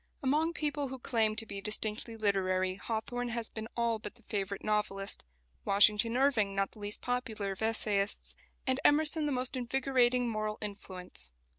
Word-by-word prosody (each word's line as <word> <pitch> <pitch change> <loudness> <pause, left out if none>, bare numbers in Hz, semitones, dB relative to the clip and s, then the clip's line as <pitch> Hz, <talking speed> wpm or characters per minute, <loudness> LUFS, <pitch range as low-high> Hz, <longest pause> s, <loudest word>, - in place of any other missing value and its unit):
Among 305 +5 +2
people 295 -2 -1
who 265 0 -6
claim 225 -4 +1
to 225 +1 0
be 200 -2 -6
distinctly 215 +2 -1
literary 185 -3 +1
Hawthorne 230 +4 -3
has 235 -1 -3
been 220 0 -6
all 235 -1 +1
but 210 +1 -8
the 235 - -21
favourite 200 -2 -3
novelist, 210 -2 -1 0.4
Washington 210 +4 +4
Irving 235 -8 +2
not 195 0 0
the - - -16
least 205 0 -3
popular 230 -5 -2
of 195 - -7
essayists, 210 -2 +2 0.3
and 260 0 +1
Emerson 305 +1 +4
the - - 0
most 255 0 0
invigorating 250 -1 +2
moral 215 -1 -2
influence. 190 - -2
220 Hz, 160 wpm, -32 LUFS, 205-250 Hz, 0.4 s, Washington